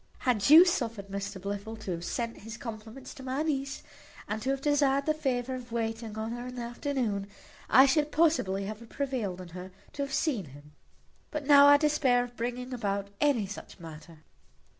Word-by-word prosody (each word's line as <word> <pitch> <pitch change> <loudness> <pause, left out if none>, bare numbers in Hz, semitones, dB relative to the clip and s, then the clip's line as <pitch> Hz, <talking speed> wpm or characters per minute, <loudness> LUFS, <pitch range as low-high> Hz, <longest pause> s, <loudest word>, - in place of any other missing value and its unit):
Had 235 -4 +1
you 325 +4 +10
suffered 230 - -2
Mr 200 0 -5
Blifil 200 +3 -5
to 195 - -4
have 170 -1 -4
sent 230 +6 -3
his 225 +2 -9
compliments 230 +1 -8
to - - -11
my 265 +3 -2
niece, 275 -2 -2 0.4
and 215 +1 -3
to 260 - -2
have 275 0 0
desired 280 -1 +2
the 310 - +2
favour 260 -4 -2
of 250 -2 -7
waiting 225 -1 -3
on 220 +1 -3
her 240 +1 -5
in 250 - -8
the 245 - -4
afternoon, 235 -5 -2 0.4
I 265 - +8
should 295 +2 +2
possibly 295 - +2
have 215 +3 -8
prevailed 245 -10 -3
on 180 - -10
her 180 +2 -8 0.2
to 285 - -4
have 280 -1 -3
seen 270 - 0
him; 145 +1 -14 0.6
but 300 -2 -4
now 285 0 +8
I 285 0 +8
despair 285 -5 +2
of 245 0 -10
bringing 245 +2 -4
about 200 -4 -2
any 275 -8 +3
such 200 0 -9
matter." 160 -1 -12
240 Hz, 190 wpm, -29 LUFS, 205-275 Hz, 0.6 s, you